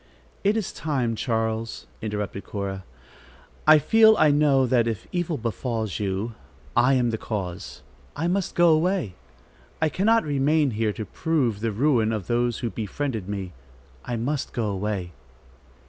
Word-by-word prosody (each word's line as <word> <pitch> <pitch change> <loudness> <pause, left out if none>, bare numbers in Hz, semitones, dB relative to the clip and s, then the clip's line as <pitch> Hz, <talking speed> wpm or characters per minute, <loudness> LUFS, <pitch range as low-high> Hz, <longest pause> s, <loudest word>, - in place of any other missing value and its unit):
"It 205 +2 +3
is 215 - -3
time, 130 -7 -1
Charles," 110 -1 -2 0.2
interrupted 105 -2 -4
Cora. 95 -2 -5 0.8
"I 155 0 +9
feel, 220 +7 +6
I 150 - +5
know 145 -2 +4
that 120 -2 +2
if 110 -4 -3
evil 175 -3 -1
befalls 115 -3 -3
you, 100 +3 -2 0.4
I 125 +3 +4
am 120 -2 +2
the 110 - -3
cause. 95 -5 -5 0.3
I 160 +4 -1
must 185 +1 -1
go 175 0 +5
away. 165 - +2 0.7
I 155 - +2
cannot 220 +8 +3
remain 145 0 +2
here 110 -1 0
to 110 +1 -5
prove 130 - 0
the 115 +1 -1
ruin 115 -1 +2
of 105 -5 -3
those 120 +1 0
who 115 - -2
befriended 110 -2 -4
me. 95 -3 -4 0.5
I 120 - -3
must 130 +5 -2
go 110 -4 -1
away." 95 -2 -3
120 Hz, 150 wpm, -25 LUFS, 105-150 Hz, 0.8 s, I